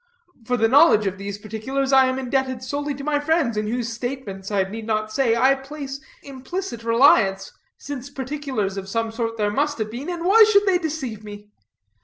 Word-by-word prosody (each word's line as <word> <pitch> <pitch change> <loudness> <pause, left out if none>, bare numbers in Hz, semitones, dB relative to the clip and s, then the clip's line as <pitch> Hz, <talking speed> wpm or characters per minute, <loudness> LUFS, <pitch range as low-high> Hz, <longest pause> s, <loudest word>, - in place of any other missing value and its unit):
For 250 +1 0
the 225 0 +3
knowledge 265 -4 +5
of 195 0 -3
those 200 0 -5
particulars 260 +6 -3
I 265 -1 +6
am 260 0 -1
indebted 260 -1 -2
solely 285 +2 -3
to 275 - -8
my 295 0 0
friends, 295 -5 +1
in 210 0 -2
whose 235 +1 -2
statements, 225 -6 -6
I 200 -2 +1
need 215 +3 -7
not 215 -1 -1
say, 235 -2 +2
I 260 +3 +4
place 275 0 -7 0.2
implicit 275 0 -6
reliance, 230 -5 +3 0.3
since 280 -2 -7
particulars 265 -8 -4
of 195 0 -6
some 225 +2 -1
sort 230 0 -3
there 210 -1 0
must 290 +6 0
have 215 -1 -3
been, 255 +8 -6
and 345 -1 -4
why 435 +4 +7
should 405 0 +4
they 375 -3 +3
deceive 280 - -4
me? 205 0 -11
255 Hz, 195 wpm, -22 LUFS, 215-280 Hz, 0.3 s, why